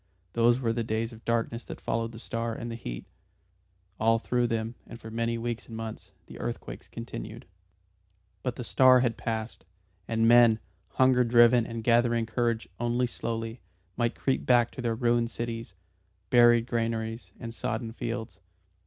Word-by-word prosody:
Those 120 +1 +4
were 115 -3 0
the 115 0 -1
days 115 +1 -2
of 115 - -14
darkness 115 0 -1
that - - -8
followed 115 0 -2
the 115 - -10
star 115 0 -3
and 120 +1 -5
the - - -4
heat. - - -6 0.9
All 115 +1 +4
through 120 +1 0
them, 115 -1 -2
and 115 - -10
for 110 - -9
many 115 +1 -1
weeks 120 0 -4
and 115 - -8
months, 110 -1 -7 0.2
the - - -11
earthquakes - - -5
continued. 115 0 -7 1.0
But 125 -2 -2
the 125 - -5
star 130 +1 +6
had 120 -3 +1
passed, 110 -1 -4 0.4
and 115 0 +2
men, 120 -1 +7 0.3
hunger 130 -1 +4
driven 120 0 +5
and 115 -1 -5
gathering 120 0 +3
courage 115 0 -1
only 120 +1 +1
slowly, 115 -1 -4 0.3
might 120 0 0
creep 135 - 0
back 120 -2 +4
to - - -7
their 115 -2 0
ruined 120 0 +2
cities, 115 -4 -5 0.6
buried 120 -1 +6
granaries, 115 -1 -2
and 115 -1 -6
sodden 115 0 -3
fields. 115 -1 -5
115 Hz, 160 wpm, -28 LUFS, 115-120 Hz, 1.0 s, men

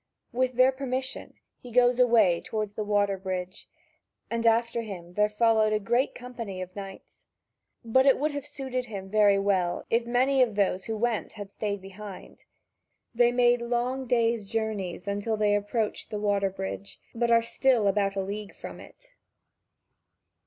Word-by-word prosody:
With 255 +1 0
their 255 +2 +5
permission 260 0 -5 0.2
he 245 - -11
goes 245 +1 +3
away 230 -8 +4
toward 215 -2 -3
the 210 +1 -4
water 205 -2 +1
bridge, 185 0 -5 0.6
and 230 0 0
after 230 +1 +2
him 180 -6 -8
there 210 +2 +2
followed 220 0 +3
a 215 - +2
great 240 +6 0
company 235 -6 -7
of 185 0 -7
knights. 195 -1 -10 0.6
But 260 +4 +3
it 270 - +6
would 300 +3 0
have 285 -1 -5
suited 265 -3 -4
him 195 -4 -8
very 205 -2 +5
well, 190 -3 0
if 230 +1 +1
many 260 +3 +3
of 230 -5 +2
those 190 -2 0
who 220 -1 -3
went 230 -1 -1
had 205 -2 -8
stayed 200 -2 -3
behind. 195 0 -11 0.7
They 240 0 +4
make 245 0 +3
long 245 +2 -1
days' 230 -3 +1
journeys 210 -5 -3
until 205 +2 -1
they 210 -1 +2
approach 205 +2 -1
the 210 - -4
water 200 -1 +1
bridge, 190 +1 -6
but 235 0 0
are 230 0 +5
still 235 -2 +2
about 195 0 +1
a 195 - 0
league 205 +1 -6
from - - -9
it. - - -16
220 Hz, 165 wpm, -27 LUFS, 200-245 Hz, 0.7 s, it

